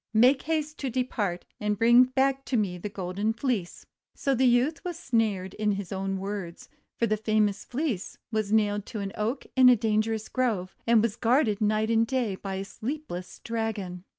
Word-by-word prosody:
Make 255 +5 +5
haste 310 -1 -2
to 270 - -2
depart, 225 -8 -2
and 210 0 -1
bring 240 +3 +6
back 265 +1 +1
to 255 - 0
me 185 -5 -1
the 210 - -5
Golden 200 +2 -2
Fleece!" 230 -7 -2 0.3
So 275 - 0
the 260 0 +3
youth 250 +6 +2
was 350 -2 -4
snared 215 - 0
in 210 -1 0
his 195 -2 -5
own 195 0 -2
words; 190 -3 -6 0.3
for 235 - +2
the 215 -1 +1
famous 215 -2 +1
Fleece 245 - -3
was 215 -2 -1
nailed 205 -2 +2
to 220 - -5
an 195 -1 -4
Oak 230 +6 -2
in 260 -1 +8
a 250 - +7
dangerous 220 0 0
Grove, 220 -8 -1
and 230 -2 +5
was 225 -2 0
guarded 230 -3 +2
night 215 +1 +1
and 225 0 +3
day 245 -5 0
by 195 0 -5
a 195 +1 -4
sleepless 220 - -6
Dragon. 215 -6 -3
220 Hz, 185 wpm, -27 LUFS, 200-250 Hz, 0.3 s, in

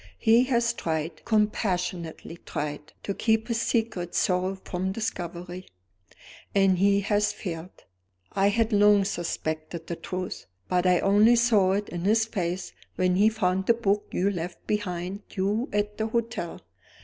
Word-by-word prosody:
He 230 - +5
has 235 -2 +1
tried, 160 -5 -3
compassionately 180 -6 -1
tried, 150 0 -5
to 200 - -2
keep 220 +2 +1
his 230 0 0
secret 215 -8 -1
sorrow 185 +1 +1
from 185 +1 -2
discovery, 180 -3 -5 0.9
and 195 -2 +4
he 200 +1 +4
has 205 +1 +1
failed. 170 -1 -7 0.5
I 195 +1 +2
had 225 +2 +1
long 205 -1 +5
suspected 165 -2 -3
the 170 - -4
truth; 185 +2 -5 0.2
but 180 0 +1
I 180 -1 +4
only 210 +4 +5
saw 215 -6 +4
it 205 +1 -1
in 175 - -5
his 220 +2 +4
face 180 -4 -3 0.2
when 180 0 +2
he 210 +3 +5
found 190 -3 0
the 235 - +5
book 205 -3 0
you 195 +3 +1
left 175 -1 -6
behind 190 -2 -2
you 205 +6 0
at 210 +1 -1
the 220 - 0
hotel. 230 -6 -3
195 Hz, 150 wpm, -26 LUFS, 180-220 Hz, 0.9 s, He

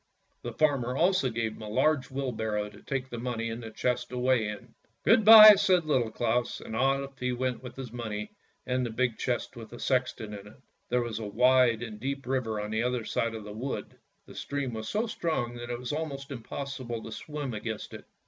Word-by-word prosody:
The - - -6
farmer 135 -5 +1
also 175 -6 +3
gave 115 -1 -2
him 110 - -12
a 105 - -6
large 135 +5 +2
wheelbarrow 110 -6 -2
to - - -15
take 135 -1 -3
the 120 - -5
money 115 -2 -3
and 115 +2 -5
the 115 - -7
chest 125 +3 -2
away 125 -3 +1
in. 105 -1 -8 0.3
"Good 220 - +5
bye! 215 0 +12
" - - -4
said 185 -4 +3
Little 130 -7 +1
Claus, 120 +2 -1
and 110 - -7
off 135 +2 0
he 125 0 -1
went 125 0 -2
with 125 -1 -9
his 130 -4 -7
money 110 -3 -5 0.3
and 125 0 0
the 120 - -2
big 120 0 -1
chest 125 -2 -2
with 115 -2 -9
the 120 - -10
sexton 125 -5 -1
in 100 0 -9
it. 105 - -15 0.3
There 125 0 +2
was 115 -2 -4
a 110 - -4
wide 125 +1 +4
and 110 -3 -7
deep 135 +2 -4
river 125 -4 -1
on 105 +1 -4
the 110 +1 0
other 125 -2 -1
side 115 0 -1
of 110 - -7
the 105 0 -8
wood, 125 +6 -5 0.3
the - - -13
stream 140 -3 -3
was 110 0 -5
so 215 +3 0
strong 160 - -2
that 120 0 -7
it 120 - -2
was 125 +3 -5
almost 145 -3 -4
impossible 130 -1 -5
to 115 - -8
swim 145 +2 -5
against 110 0 -5
it. - - -9
125 Hz, 220 wpm, -29 LUFS, 110-135 Hz, 0.3 s, bye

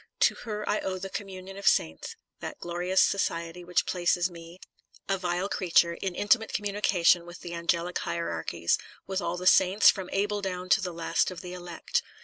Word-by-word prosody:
To - - +5
her 210 -2 -6
I 210 - +1
owe 185 -1 -3
the 195 +1 -6
Communion 195 -1 -7
of 200 -1 -4
Saints, 80 - +1 0.2
that - - -6
glorious 175 +2 -1
society 170 -2 -1
which 175 0 +1
places 175 0 +1
me, 170 +1 -12 0.5
a 195 - +2
vile 180 +1 -1
creature, 175 -3 +3
in 185 +1 -4
intimate 220 +3 +2
communication 200 -4 +2
with 175 +1 -11
the 175 - -7
angelic 170 +1 -1
hierarchies, 85 0 -1 0.3
with 190 0 -2
all 170 +1 -2
the 180 - -6
saints, 190 +2 +6
from 190 -3 -7
Abel 205 +1 0
down 185 -1 -4
to 195 - +5
the 180 -2 -3
last 165 -1 0
of 180 -2 -8
the 180 -1 -8
elect. 175 -1 -3
180 Hz, 180 wpm, -28 LUFS, 170-195 Hz, 0.5 s, saints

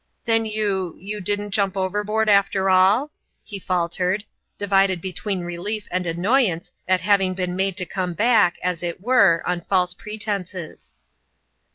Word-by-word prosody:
" - - -49
Then 225 -1 +2
you 200 -5 -1
you 205 +3 -5
didn't 205 +2 0
jump 195 -2 0
overboard 210 +3 0
after 200 -2 +3
all? 200 +10 +4 0.2
" - - -49
he 200 - -4
faltered, 180 +2 -1 0.3
divided 195 -2 +2
between 190 +2 -3
relief 180 +5 -4
and 180 0 -1
annoyance 180 +1 +1 0.2
at 185 -1 +2
having 195 -2 +2
been 180 -1 -2
made 190 0 -1
to 180 - -1
come 180 -1 -3
back, 215 -4 +3
as 180 -2 -1
it 175 0 -4
were, 200 -8 +4
on 180 -1 -1
false 180 0 0
pretenses. 200 -4 -5
190 Hz, 155 wpm, -22 LUFS, 180-210 Hz, 0.3 s, all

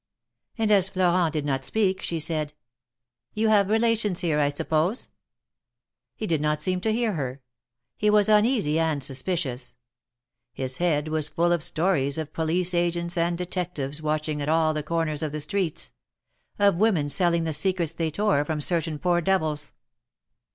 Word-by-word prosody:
And 220 -2 +1
as 195 -2 +5
Florent 180 -3 +2
did 150 -2 -2
not 135 -2 -1
speak, 190 +3 0
she 165 - -3
said: 155 -1 -2 0.8
You 220 +1 +2
have 205 -2 +4
relations 220 -4 +1
here, 160 -4 +1
I 145 -1 +3
suppose?" 160 - -1 1.0
He 220 - -4
did 160 -7 0
not 150 0 0
seem 180 +3 0
to 220 - +1
hear 225 -1 0
her. 135 -4 -4 0.5
He 210 - +2
was 210 0 +4
uneasy 210 - +3
and 160 -4 0
suspicious. 135 -3 -2 0.8
His 130 0 -3
head 160 -4 +1
was 155 -1 -1
full 175 0 +1
of 170 -2 +1
stories 155 -4 0
of 155 -1 -5
police 170 +3 0
agents 170 0 0
and 170 0 0
detectives 175 -5 -4
watching 155 -1 -2
at 145 - -2
all 160 0 +3
the 155 - -2
corners 155 -1 -1
of 155 -2 -3
the 155 - -3
streets 185 -1 -2 0.3
— - - -60 0.3
of 200 -4 +3
women 185 -8 +2
selling 170 +2 +1
the 160 -1 -2
secrets 170 +1 0
they 165 -1 -2
tore 200 -3 +1
from 155 0 -3
certain 165 0 0
poor 175 +2 +1
devils. 155 -5 0
165 Hz, 165 wpm, -25 LUFS, 150-185 Hz, 1.0 s, as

